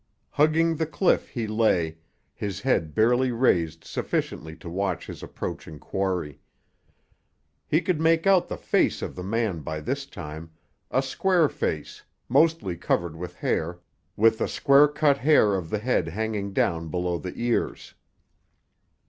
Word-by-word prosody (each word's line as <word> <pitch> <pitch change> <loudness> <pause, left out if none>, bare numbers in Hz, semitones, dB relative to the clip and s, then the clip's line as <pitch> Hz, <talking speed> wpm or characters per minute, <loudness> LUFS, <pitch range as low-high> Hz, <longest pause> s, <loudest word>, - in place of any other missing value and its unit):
Hugging 160 +2 +3
the 160 - -1
cliff 165 +4 +1
he 120 -4 -3
lay, 100 -7 +1 0.4
his 100 -1 -5
head 85 - 0
barely 125 +3 +3
raised 85 -10 +1
sufficiently 80 0 -3
to 85 +2 -12
watch 95 0 -2
his - - -9
approaching 80 - -6
quarry. 90 -4 -3 1.3
He 155 - +2
could 170 -2 -1
make 165 0 +3
out 195 -2 +4
the - - -5
face - - +1
of - - -5
the 90 - -6
man 105 -2 -1
by 80 +1 -5
this 135 - -3
time, 80 - -8 0.4
a 130 - +1
square 170 +4 +2
face, - - -4 0.3
mostly 155 - +2
covered 85 -1 -1
with 90 +2 -7
hair, 85 +2 -1 0.4
with 110 +1 +4
the - - 0
square 140 +1 +5
cut 150 -1 +2
hair 130 -7 +4
of 90 -4 -2
the 105 - -1
head 105 -6 0
hanging 105 +2 -3
down 85 -3 0
below 90 0 -1
the 90 - -6
ears. 120 0 -2
110 Hz, 150 wpm, -25 LUFS, 85-140 Hz, 1.3 s, square